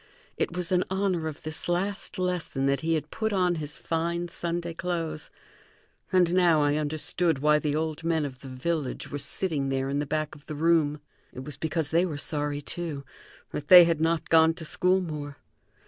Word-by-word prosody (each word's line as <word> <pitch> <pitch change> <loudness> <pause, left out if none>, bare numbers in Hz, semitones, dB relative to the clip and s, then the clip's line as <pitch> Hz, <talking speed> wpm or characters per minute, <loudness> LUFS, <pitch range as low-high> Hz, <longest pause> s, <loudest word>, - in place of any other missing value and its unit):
It 175 - -2
was 180 0 -1
in 180 0 +3
honor 190 -4 0
of 155 -2 -7
this 155 +2 -3
last 195 +4 -1
lesson 180 -7 -1
that 140 -1 +1
he 165 0 +1
had 155 - -4
put 220 0 -1
on 180 -3 +2
his 150 0 -6
fine 170 +1 -2
Sunday 170 0 -3
clothes, 165 -3 -3 0.8
and 180 -2 +3
now 170 -4 +4
I 145 +1 +2
understood 155 +2 0
why 150 +2 +3
the 150 -1 -1
old 160 0 -2
men 160 -2 +1
of 130 -3 -7
the 135 - -11
village 135 +1 -3
were 145 - -3
sitting 145 -1 -1
there 135 0 -1
in 140 +1 -1
the 145 - -2
back 155 0 -2
of 145 - -15
the 155 - -5
room. 155 -2 +2 0.3
It 130 - -7
was 145 0 -7
because 160 0 -2
they 170 +3 +3
were 155 -4 -4
sorry, 145 -1 -2
too, 155 -4 -5 0.5
that 145 - -5
they 180 -1 +11
had 165 -2 +1
not 165 0 0
gone 160 0 +5
to 165 - -7
school 185 +4 +2
more. 150 -4 -6
160 Hz, 195 wpm, -27 LUFS, 145-175 Hz, 0.8 s, they